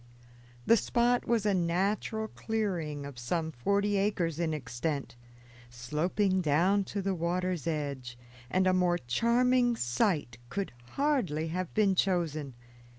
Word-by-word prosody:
The 230 - +6
spot 240 +2 +1
was 230 -3 +1
a 205 - +3
natural 195 +5 0
clearing 175 -12 -3
of 140 -3 -8
some 160 +6 -2
forty 200 +9 +1
acres 180 -5 0
in 165 -2 0
extent, 140 0 -3 0.5
sloping 170 - 0
down 180 +6 +2
to 200 0 -4
the 195 0 0
water's 175 -1 -1
edge, 140 -6 -3 0.3
and 185 0 +2
a 185 - +4
more 180 -1 +2
charming 240 - +2
site 125 - 0
could 200 -1 -3 0.2
hardly 225 - 0
have 180 +1 -3
been 205 -3 +4
chosen. 160 -8 0
180 Hz, 130 wpm, -30 LUFS, 150-205 Hz, 0.5 s, The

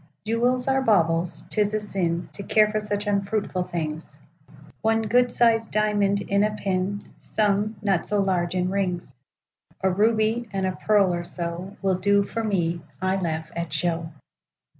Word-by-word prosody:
Jewels 245 +3 +1
are 270 0 +2
baubles; 170 -7 +2
'tis 210 0 +2
a - - +3
sinTo 190 -2 -3
care 215 -1 +4
for 215 - 0
such 210 0 -1
unfruitful 200 -2 -1
things;—One 170 +7 -4
good 245 +3 +3
sized 225 -2 +3
diamond 205 -1 +2
in 200 +1 +1
a 210 0 0
pin,—Some, 205 +2 -1
not 195 -4 +1
so 210 - +1
large, 185 -2 0
in 180 0 0
rings,—A 180 -1 -4
ruby, 220 +3 +1
and 195 -1 -1
a 185 - +1
pearl, 200 -4 +3
or 175 0 -2
so, 175 +3 -6
Will 190 -2 +1
do 200 +1 +3
for 225 +3 -4
me;—I 185 -1 -1
laugh 160 -3 -3
at 170 -2 -3
show. 165 0 -1
200 Hz, 140 wpm, -24 LUFS, 175-215 Hz, -, care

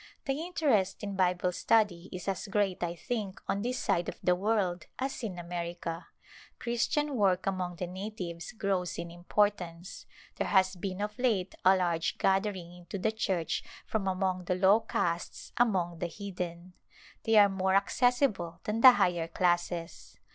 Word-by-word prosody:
The 270 - +1
interest 280 - +1
in 200 -1 -3
Bible 180 -1 +2
study 190 -2 +1
is 180 0 -7
as 195 +1 -2
great, 195 -2 0
I 175 -1 -2
think, 210 -2 -4
on 200 - 0
this 250 +3 -1
side 170 -6 0
of - - -7
the 180 - +4
world 185 -3 0
as 265 +1 -3
in 205 -7 -4
America. 170 -1 -5 0.5
Christian 270 +5 0
work 190 -5 +2
among 185 -2 -2
the 180 - -3
natives 180 -2 -6
grows 195 -5 -1
in 170 0 -5
importance; 175 -1 -1 0.3
there - - -1
has 190 -1 +3
been 185 +2 -4
of 210 +2 -4
late 210 -8 +1
a 190 +1 +6
large 170 -3 0
gathering 190 -3 0
into 175 +2 -7
the 215 +3 0
Church 190 -7 -1 0.2
from 210 -3 -2
among 185 -1 -1
the 180 - 0
low 190 +4 +5
castes 175 -6 -3
among 185 -8 +1
the 175 - -1
heathen. 180 -2 -6 0.5
They 225 - +2
are 205 -1 +9
more 190 -1 0
accessible 200 -6 +1
than 215 +2 -2
the 255 0 +11
higher 175 -7 +1
classes. 175 0 -1
190 Hz, 160 wpm, -30 LUFS, 175-210 Hz, 0.5 s, the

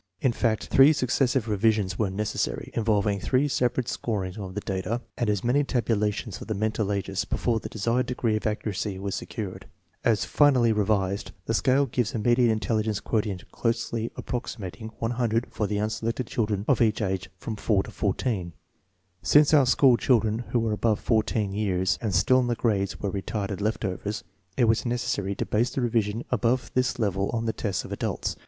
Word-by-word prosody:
In 130 - +2
fact, 115 -2 0
three 135 +3 +7
succes 130 -2 +1
sive 125 -3 0
revisions 105 -2 +1
were 105 -3 +1
necessary, 100 - -2
involving 105 -3 +1
three 130 +7 +1
separate 125 -2 0
scorings 95 -5 -3
of 95 -3 -7
the 105 - -2
data 100 +5 -2
and 120 -3 -1
as 105 -3 0
many 130 +5 +3
tabulations 110 -5 -1
of - - -8
the 110 - -2
mental 110 0 -1
ages, 95 -1 -1
before 115 -2 0
the - - -7
desired 115 +4 0
degree 120 -3 0
of 110 - -1
accuracy 105 -2 -2
was 100 0 -4
secured. 105 -6 -5 0.4
As 110 -3 +2
finally 130 -6 +4
revised, 100 -1 0
the 115 - -1
scale 135 +4 +3
gives 120 -4 -1
a - - +1
median 120 +2 +3
in 110 -1 +1
telligence 110 -2 0
quotient 105 -5 -2
closely 115 -1 -1
approximating 110 -3 -5
100 115 0 0
for 105 - -1
the 105 - -1
unselected 115 +3 -2
children 105 -3 -1
of 130 -4 +3
each 110 -2 +3
age 95 -3 -2
from 110 +4 -5
4 105 -2 +1
to - - -10
14. 100 -4 -1 0.7
Since 150 +1 +5
our 140 -4 +6
school 125 -1 +5
children 115 -4 +2
who - - +1
were 115 -1 0
above 110 0 +1
14 110 -3 0
years 95 -3 0
and 110 -4 -1
still 130 +8 +4
in 125 - +1
the 120 - 0
grades 100 -5 0
were 100 - -2
retarded 100 0 -3
left 110 +1 -1
overs, 100 +2 -3 0.3
it - - +3
was 115 0 +3
neces 120 0 -1
sary 100 0 -1
to - - -2
base 115 +3 +1
the 130 - -3
revision 115 -2 0
above 125 +1 +1
this 130 +1 +1
level 100 -4 0
on 115 -1 -1
the 110 - 0
tests 100 -4 -2
of - - -9
adults. - - -2
110 Hz, 190 wpm, -26 LUFS, 100-120 Hz, 0.7 s, three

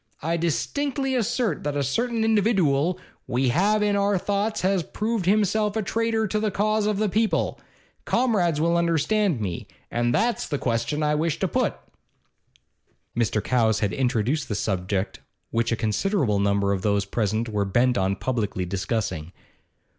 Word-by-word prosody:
I 165 +2 0
distinctly 270 - -1
assert 235 - 0
that 145 -1 -2
a 140 - +1
certain 230 - 0
individooal 185 -8 +2 0.3
we 125 +1 +1
all 145 - -1
have 210 +2 +3
in 205 -1 +2
our 200 0 +2
thoughts 205 +3 -1
has 190 0 +2
proved 215 +2 -2
himself 210 +1 +2
a 220 - 0
traitor 225 +2 0
to 215 +1 -1
the 215 0 0
cause 210 +1 +1
of 210 -2 0
the 215 +1 +1
people. 215 +3 0 0.4
Comrades 195 - +1
will 170 +2 +2
understand 170 - +1
me. 95 -5 -4 0.2
And 120 0 +1
that's 230 - +1
the 145 - -1
question 130 +5 -1
I 150 0 +2
wish 155 +1 0
to - - 0
put.' - - 0 1.4
Mr. 110 -2 0
Cowes 110 -4 +2
had 105 -2 0
introduced 130 +3 0
the 105 - -1
subject 95 -1 -2 0.3
which 115 +1 0
a - - +2
considerable 110 - 0
number 100 0 +1
of 95 - -2
those 100 0 +1
present 110 +2 -1
were 105 -2 0
bent 120 +6 +2
on 95 0 +1
publicly 105 -5 -2
discussing. 95 -3 -3
160 Hz, 160 wpm, -24 LUFS, -, 1.4 s, have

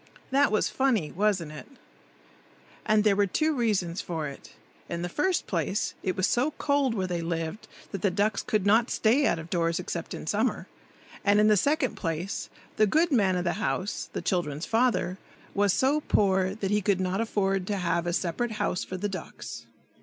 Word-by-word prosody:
That 275 -1 +4
was 215 - +2
funny, 235 - +1
wasn't 190 -5 0
it? 150 - -9 1.2
And 215 0 +4
there 210 -2 +4
were 200 0 +3
two 310 - +1
reasons 200 - 0
for 160 -3 -3
it. 140 - -11 0.4
In 170 0 -3
the 175 - -2
first 360 - 0
place, 180 +2 -1
it 185 - -2
was 185 - +2
so 260 +8 +1
cold 280 -4 +1
where 190 -3 0
they 175 -2 -2
lived 165 +3 -3 0.2
that 195 - -5
the 200 - +3
ducks 200 +3 0
could 215 -5 0
not 225 +4 +4
stay 255 +7 +3
out - - +1
of 160 +1 -9
doors, 170 -1 +1
except - - -4
in - - -7
summer; - - 0 0.6
and 205 +1 +4
in 215 0 +5
the 210 - +6
second 285 - +1
place, 165 +2 -3 0.3
the 215 - +5
good 325 - +2
man 200 -8 +3
of 180 - 0
the 175 - 0
house, 205 -1 -2
the - - -4
children's 160 -4 -1
father, 220 -6 +1 0.3
was 200 0 +3
so 275 +9 +2
poor 190 -1 +2
that 200 -3 -3
he 210 0 +2
could 200 -1 +1
not 185 +3 0
afford 195 -4 0
to 205 - -1
have 175 -1 0
a - - +1
separate 190 +7 -1
house 200 -3 -1
for 185 - -6
the 205 +3 -1
ducks. 185 -3 -7
195 Hz, 195 wpm, -27 LUFS, 175-220 Hz, 1.2 s, the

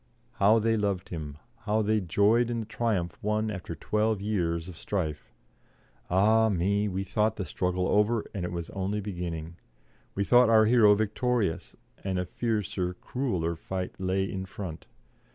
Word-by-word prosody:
How 105 +3 +6
they 115 0 +2
loved 100 -3 -1
him, 75 -4 -6 0.2
how 110 0 0
they 110 +1 +2
joyed 105 +7 +3
in 120 -1 -1
the - - -6
triumph 105 -7 -2
won 105 +1 0
after 90 -4 -6
twelve 105 +5 0
years 85 -5 -1
of 90 - -9
strife. 80 -7 -3 0.8
Ah 110 +5 +4
me! 100 +2 +1
we 95 -1 -2
thought 105 +3 0
the 95 - -4
struggle 90 0 -1
over, 105 +2 +2
and 95 -4 -3
it 90 - -3
was 85 -1 -5
only 100 +2 -2
beginning; 85 -4 -5 0.6
we 100 - +1
thought 120 +2 +5
our 110 -1 +6
hero 110 -3 +6
victorious, 110 -2 -1 0.3
and 95 -1 -1
a 90 - -1
fiercer, 95 -4 -2
crueller 90 -10 -2
fight 90 +2 -4
lay 95 +1 0
in 95 0 -4
front. 90 -4 -7
100 Hz, 160 wpm, -28 LUFS, 90-110 Hz, 0.8 s, How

